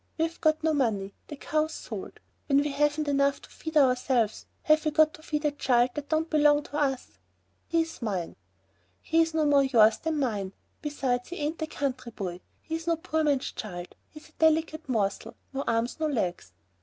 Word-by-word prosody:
We've 330 Hz, +1 st, -2 dB
got 310 Hz, 0 st, +2 dB
no 320 Hz, -1 st, +2 dB
money. 210 Hz, -8 st, 0 dB
The 295 Hz, -, -7 dB
cow's 310 Hz, +2 st, -1 dB
sold. -, -, -7 dB, 0.3 s
When 275 Hz, -, +4 dB
we 290 Hz, +1 st, +2 dB
haven't 295 Hz, +1 st, +1 dB
enough 280 Hz, 0 st, +2 dB
to -, -, -13 dB
feed 320 Hz, -1 st, -4 dB
ourselves, 250 Hz, -5 st, +2 dB, 0.2 s
have 310 Hz, 0 st, +4 dB
we 310 Hz, -, +2 dB
got 310 Hz, +1 st, +4 dB
to -, -, -13 dB
feed 300 Hz, -1 st, -3 dB
a 295 Hz, -, +3 dB
child 250 Hz, -3 st, +2 dB
that 290 Hz, -1 st, -6 dB
don't 315 Hz, +1 st, +1 dB
belong 295 Hz, -2 st, +4 dB
to 295 Hz, -, -4 dB
us?" 270 Hz, -3 st, -2 dB, 0.5 s
"He's 330 Hz, -2 st, -1 dB
mine." 190 Hz, -7 st, -3 dB, 0.6 s
"He's 325 Hz, 0 st, +1 dB
no 315 Hz, -1 st, +2 dB
more 285 Hz, -1 st, +5 dB
yours 225 Hz, -5 st, +5 dB
than 320 Hz, -1 st, -2 dB
mine. 210 Hz, -8 st, -1 dB, 0.3 s
Besides, 260 Hz, -4 st, -2 dB
he 350 Hz, -, -6 dB
ain't 310 Hz, 0 st, -3 dB
a 315 Hz, -, -1 dB
country 255 Hz, -5 st, -3 dB
boy. 180 Hz, -3 st, -5 dB, 0.2 s
He's 325 Hz, +1 st, -5 dB
no 335 Hz, -, +3 dB
poor 315 Hz, -1 st, -1 dB
man's 285 Hz, -3 st, +1 dB
child. 175 Hz, -4 st, -7 dB, 0.2 s
He's 305 Hz, 0 st, -14 dB
a 310 Hz, -, -32 dB
delicate 315 Hz, -2 st, +2 dB
morsel, 220 Hz, 0 st, -1 dB, 0.2 s
no 275 Hz, +1 st, -2 dB
arms, 230 Hz, +5 st, 0 dB
no 315 Hz, -, +1 dB
legs." 180 Hz, -, -2 dB
290 Hz, 190 wpm, -28 LUFS, 245-315 Hz, 0.6 s, more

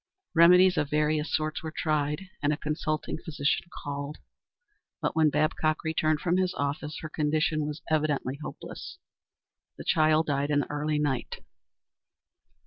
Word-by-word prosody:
Remedies 180 Hz, +2 st, +7 dB
of 145 Hz, -, +1 dB
various 150 Hz, +1 st, +1 dB
sorts 155 Hz, 0 st, -1 dB
were 160 Hz, -, -4 dB
tried, 155 Hz, +3 st, -1 dB
and 145 Hz, -, +2 dB
a 150 Hz, -, 0 dB
consulting 155 Hz, +1 st, -2 dB
physician 160 Hz, -1 st, -1 dB, 0.2 s
called, 145 Hz, +1 st, -4 dB, 0.8 s
but -, -, -1 dB
when 160 Hz, -1 st, +5 dB
Babcock 155 Hz, +1 st, +1 dB
returned 155 Hz, -1 st, +1 dB
from 175 Hz, +1 st, +1 dB
his 185 Hz, -1 st, 0 dB
office 145 Hz, +2 st, -3 dB
her 155 Hz, -, -4 dB
condition 155 Hz, 0 st, 0 dB
was 150 Hz, +1 st, -6 dB
evidently 150 Hz, -3 st, 0 dB
hopeless. -, -, -8 dB, 0.8 s
The -, -, -7 dB
child 155 Hz, 0 st, +3 dB
died 145 Hz, -1 st, 0 dB
in 145 Hz, -1 st, +3 dB
the -, -, -6 dB
early 150 Hz, +1 st, -1 dB
night. 140 Hz, -5 st, -2 dB
155 Hz, 140 wpm, -28 LUFS, 150-160 Hz, 0.8 s, Remedies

